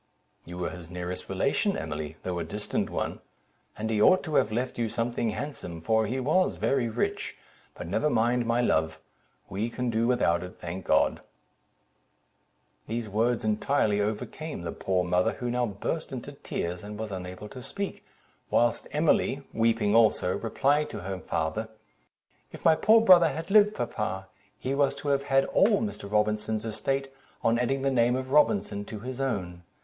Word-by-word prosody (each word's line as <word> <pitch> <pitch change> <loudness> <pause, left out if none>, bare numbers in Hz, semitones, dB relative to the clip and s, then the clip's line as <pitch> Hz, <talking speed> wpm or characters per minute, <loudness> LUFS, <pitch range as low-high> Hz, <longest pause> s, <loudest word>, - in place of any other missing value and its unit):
"You 85 +1 -8
were 90 - -2
his 85 -2 -10
nearest 90 0 -5
relation, 140 - +1
Emily, 80 0 -5
though 90 -1 -2
a - - -2
distant 105 +6 -3
one; - - -3 0.6
and 110 - -2
he 105 -1 +1
ought 185 +10 +6
to 155 - -5
have 110 - +3
left 125 +2 -2
you 115 -1 0
something 115 0 -1
handsome, 105 - -5
for 110 +6 +1
he 130 +5 -2
was 155 +8 +2
very 130 -4 +1
rich: 115 +2 -2 0.4
but - - -7
never 100 - +1
mind, 120 -1 +2
my 120 +1 +2
love—we 80 +4 -3
can 125 +1 -2
do 115 +1 +1
without 105 -9 +2
it, 90 0 -9
thank 85 +2 -6
God." - - +3 1.7
These 115 0 -3
words 115 +3 +1
entirely 110 -1 +1
overcame 110 - -4
the 85 - -3
poor 95 -1 0
mother, 90 0 +2
who 125 -1 -3
now 125 0 +1
burst 100 -2 -4
into - - -6
tears, 90 +2 -4
and 105 0 -7
was 110 -1 -5
unable 95 +2 -6
to 130 - -9
speak, 200 +10 -5 0.5
whilst 120 -1 +2
Emily 150 -2 +2
(weeping 115 -2 +2
also) 110 -5 +4
replied 140 +6 +1
to - - -6
her 95 +1 -4
father—"If 110 +8 -7
my 165 - +7
poor 220 +7 +5
brother 180 -6 +7
had 165 +5 -5
lived, 210 0 +6
papa, 95 -5 -3 0.3
he 130 - -3
was 140 0 +2
to 145 - -4
have 140 0 +1
had 135 -1 +3
all 205 +1 +3
Mr. 155 - -5
Robinson's 105 +1 0
estate, 135 +5 -2 0.3
on 115 +1 +3
adding 135 +2 0
the 135 - +2
name 120 -1 +3
of 130 0 -4
Robinson 150 - +3
to 105 -1 -7
his 130 +2 -5
own. 90 -10 -2
115 Hz, 170 wpm, -28 LUFS, 95-135 Hz, 1.7 s, my